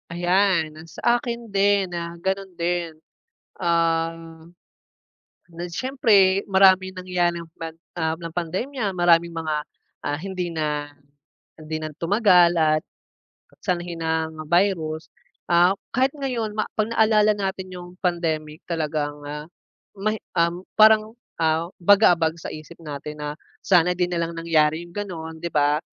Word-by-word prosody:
Ayan, 175 -1 +2
ang 165 +1 -12
sa 240 +8 +1
akin 235 -2 -5
din 200 -1 +2
na 170 -1 -5
ganun 190 +2 -2
din. 170 -1 -1 0.6
Ah, 165 -1 +1 1.4
na 170 0 -8
siyempre 200 -3 +3
maraming 190 -1 +5
nangyari, 180 -2 -1
ah, 165 - -12
pan 165 -1 -6 0.2
ah, 160 -1 0
ng 165 0 -8
pandemya 195 - -2
maraming 170 -1 +3
mga, 160 -2 -2 0.5
ah, 145 - -1
hindi 185 -2 -4
na 150 -2 -2 0.7
hindi 155 0 -4
na 155 0 -4
tumagal 180 -2 +4
at 155 -1 +3 0.8
sanhi 175 -2 -2
ng 160 -1 -2
virus. 170 -3 +1 0.4
Ah, 175 +2 +5 0.2
kahit 260 +2 +2
ngayon 245 -7 -3
ma 215 - +1
pag 215 0 +1
naalala 215 -1 +4
natin 190 -2 -4
'yung 175 -1 -8
pandemic 160 -3 -1
talagang, 150 -3 -2
ah, 150 +1 -6 0.5
may, 215 +2 -1 0.2
um, 170 +1 +1 0.2
parang, 215 +1 +6 0.3
ah 160 +1 +2 0.2
bagabag 175 -4 +5
sa - - -6
isip 155 +2 -10
natin 150 0 -7
na 150 0 -3 0.3
sana 180 -2 +4
'di 180 0 +1
na 170 -1 0
lang 170 - -6
nangyari 160 -1 +2
'yung 170 - -16
gano'n 165 -6 -6
'di 170 - -3
ba. 145 0 +2
175 Hz, 135 wpm, -23 LUFS, 160-195 Hz, 1.4 s, parang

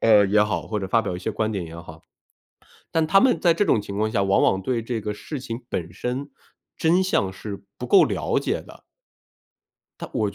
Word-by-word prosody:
呃， 105 -2 +6
也 105 +2 +4
好， 105 - -1
或 105 -1 -2
者 95 - -4
发 115 +3 +3
表 90 - -3
一 - - -4
些 95 - -3
观 110 +1 -1
点 95 -5 -3
也 80 +1 -10
好。 80 -1 -11 0.9
但 160 -1 +1
他 195 +5 +5
们 255 +1 +4
在 170 - +4
这 185 +5 +1
种 110 - +3
情 100 0 -6
况 110 +1 +1
下， 100 - +1
往 95 0 +3
往 95 - +2
对 120 +3 -1
这 115 -1 -3
个 105 - -2
事 140 +8 -7
情 120 -2 -6
本 85 -1 -4
身 125 +8 -4 0.5
真 170 +3 +3
相 140 - +1
是 100 +1 -8
不 - - -6
够 - - +6
了 - - 0
解 - - -2
的。 - - -15 1.2
但 - - -7
我 - - -1
110 Hz, 240 characters per minute, -24 LUFS, 100-130 Hz, 1.2 s, 呃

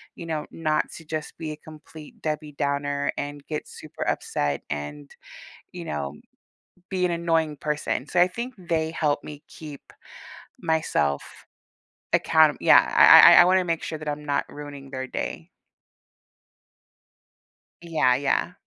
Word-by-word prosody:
you 170 - -9
know, 155 -2 -3
not 155 -2 -1
to 165 - -13
just 155 -1 -5
be 160 -2 -4
a 150 - -6
complete 155 0 -14
Debbie 150 -1 -3
Downer 140 0 -1
and 145 0 -5
get 150 -1 -5
super - - -8
upset 70 -1 -1
and, 75 0 -6 0.6
you 175 -1 -8
know, 70 - -4 0.8
be 185 -2 0
an 175 - 0
annoying 165 -3 0
person, 150 -3 -2
so 180 - 0
I 175 - +6
think 235 +7 -6
they 165 -3 -2
help 150 -3 -1
me 150 -1 -10
keep 150 -3 -10 0.8
myself 155 - 0 0.9
account 160 -1 +4
Yeah, - - +7 0.2
I - - +9
I - - +8
I - - +10
I - - +6
wanna 185 0 +3
make 165 -2 -2
sure 155 - -5
that 155 - -5
I'm 150 0 -5
not 145 -1 0
ruining 145 -2 -10
their 130 -1 -4
day. - - -5 2.3
Yeah, 160 -7 +2
yeah. 145 +6 0
150 Hz, 150 wpm, -24 LUFS, 140-165 Hz, 2.3 s, I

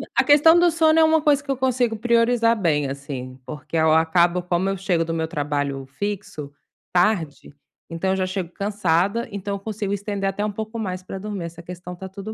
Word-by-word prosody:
A - - +4
questão 300 +3 +6
do 350 0 +5
sono 320 0 +3
é - - +6
uma 320 0 +4
coisa 290 -2 +2
que 275 - -22
eu 270 - 0
consigo 250 -3 +1
priorizar 235 0 +3
bem, 150 -8 +1
assim, 135 -2 -7
porque 150 +2 -8
eu 160 -1 +3
acabo, 170 +2 +3
como 180 +2 0
eu 195 - -2
chego 180 -3 0
do 165 0 -4
meu 160 -1 -1
trabalho 145 -3 -2
fixo, 165 -3 -5 0.4
tarde, 175 -5 0 0.4
então 170 +3 -1
eu - - +1
já 185 -1 -1
chego 185 -2 -4
cansada, 200 +2 0
então 200 0 -4
eu - - -6
consigo 205 -1 -4
estender 200 -1 -2
até 205 +2 -2
um 210 - -2
pouco 220 +2 -6
mais 185 -4 -4
pra 185 +1 -7
dormir. 200 -3 -5
Essa 170 0 -9
questão 180 +1 -8
tá 190 +2 -8
tudo 200 +3 -8
190 Hz, 210 wpm, -22 LUFS, 165-220 Hz, 0.4 s, questão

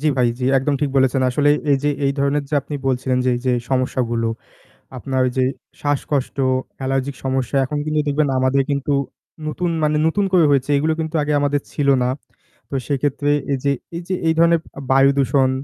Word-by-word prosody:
জি 155 - -1
ভাই, 125 - +4
জি, 125 - -2
একদম 140 +2 0
ঠিক 145 -2 0
বলেছেন। 130 0 +3
আসলে 145 +3 +2 0.2
এই - - +4
যে - - +3 0.2
এই 135 - +1
ধরনের 140 +1 +1
যে 150 - -2
আপনি 145 - -8
বলছিলেন 130 0 0
যে - - +2
এই - - -5
যে 130 - +3 0.2
সমস্যাগুলো, 125 -3 0 0.7
আপনার 130 0 -1
যে 130 - +3 0.4
শ্বাসকষ্ট, 145 -1 -1 0.4
অ্যালার্জিক 135 +1 -2
সমস্যা। 130 0 0
এখন 150 +3 -4
কিন্তু 155 0 +1
দেখবেন 145 +1 +1
আমাদের 130 +1 +2
কিন্তু 140 +1 -1 0.5
নতুন 175 +3 -2
মানে 150 0 +2
নতুন 200 +5 +1
করে 175 -3 +5
হয়েছে। 140 -1 +2
এগুলো 155 +3 +1
কিন্তু 160 +1 -3
আগে 150 +1 -1
আমাদের 145 0 0
ছিল 145 - -1 0.2
না। 125 - +1 0.6
তো - - -4
সেইক্ষেত্রে 145 +1 -1 0.2
এই - - +1
যে 140 - +2 0.2
এই 170 - -4
যে 185 - -1
এই 160 - +4
ধরনের 170 0 +5 0.2
আ - - -6
বায়ুদূষণ 135 0 +3
140 Hz, 190 wpm, -20 LUFS, 130-150 Hz, 0.7 s, করে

